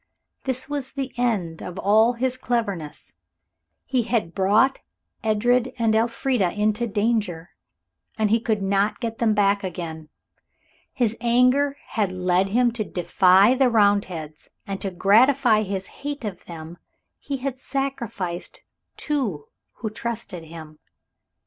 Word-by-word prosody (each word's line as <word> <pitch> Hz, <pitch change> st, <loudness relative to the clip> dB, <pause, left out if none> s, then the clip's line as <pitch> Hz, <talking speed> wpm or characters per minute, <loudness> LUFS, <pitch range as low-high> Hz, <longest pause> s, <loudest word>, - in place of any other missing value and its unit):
This 260 Hz, -1 st, 0 dB
was 285 Hz, -2 st, -3 dB
the 270 Hz, -2 st, -4 dB
end 205 Hz, -10 st, -1 dB
of 180 Hz, 0 st, -7 dB
all 220 Hz, +5 st, +4 dB
his 255 Hz, +1 st, -1 dB
cleverness. 205 Hz, -, -3 dB, 0.7 s
He 255 Hz, -2 st, +1 dB
had 225 Hz, -7 st, -1 dB
brought 210 Hz, +8 st, +3 dB, 0.4 s
Edred 240 Hz, +4 st, +2 dB
and 225 Hz, -2 st, +2 dB
Elfrida 230 Hz, -3 st, +1 dB
into 215 Hz, +3 st, 0 dB
danger, 205 Hz, -6 st, -1 dB, 0.7 s
and 215 Hz, -2 st, +1 dB
he 225 Hz, -, +4 dB
could 220 Hz, -3 st, -1 dB
not 195 Hz, +2 st, +1 dB
get 230 Hz, -2 st, -4 dB
them 220 Hz, -2 st, +2 dB
back 200 Hz, -1 st, +2 dB
again. 160 Hz, -4 st, -6 dB, 0.8 s
His 230 Hz, -4 st, 0 dB
anger 250 Hz, +4 st, +3 dB
had 210 Hz, -6 st, 0 dB
led 185 Hz, +1 st, +1 dB
him 240 Hz, +3 st, +3 dB
to 230 Hz, -2 st, -3 dB
defy 185 Hz, +4 st, +4 dB
the 260 Hz, -1 st, +3 dB
Roundheads, 200 Hz, -8 st, 0 dB, 0.2 s
and 195 Hz, -1 st, -5 dB
to 195 Hz, -, -2 dB
gratify 220 Hz, +5 st, +4 dB
his 195 Hz, -2 st, -3 dB, 0.2 s
hate 285 Hz, -3 st, -4 dB
of 195 Hz, -4 st, -6 dB
them 165 Hz, 0 st, -9 dB, 0.4 s
he 280 Hz, -, -4 dB
had 260 Hz, 0 st, -4 dB
sacrificed 235 Hz, -11 st, -3 dB
those -, -, -14 dB
two 235 Hz, -, -2 dB, 0.3 s
who 220 Hz, -3 st, -5 dB
trusted 220 Hz, -7 st, -5 dB
him. 155 Hz, -1 st, -11 dB
215 Hz, 135 wpm, -23 LUFS, 185-245 Hz, 0.8 s, all